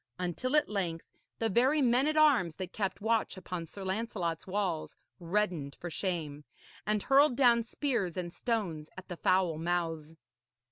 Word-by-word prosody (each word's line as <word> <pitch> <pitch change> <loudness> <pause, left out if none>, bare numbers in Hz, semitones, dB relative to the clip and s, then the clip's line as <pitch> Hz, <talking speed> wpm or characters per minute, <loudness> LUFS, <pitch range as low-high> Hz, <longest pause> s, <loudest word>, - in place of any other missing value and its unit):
Until 180 - -1
at 300 - +4
length 175 -5 -3 0.3
the 225 - +1
very 255 +8 +3
men 255 +1 +3
at 310 0 0
arms 265 - +4
that 185 -1 -6
kept 195 -3 -2
watch 225 -2 0
upon 180 -2 -5
Sir 195 +4 -9
Lancelot's 190 -4 -2
walls 185 -5 -2 0.2
reddened 175 -5 -1
for 175 - -7
shame, 155 -5 -3 0.4
and 210 -1 +1
hurled 275 0 +5
down 240 -3 +5
spears 230 - -2
and 175 -1 -4
stones 185 -11 -2
at 185 - -10
the 175 - -5
foul 180 -4 +2
mouths. 165 -2 -2
190 Hz, 155 wpm, -31 LUFS, 170-230 Hz, 0.4 s, hurled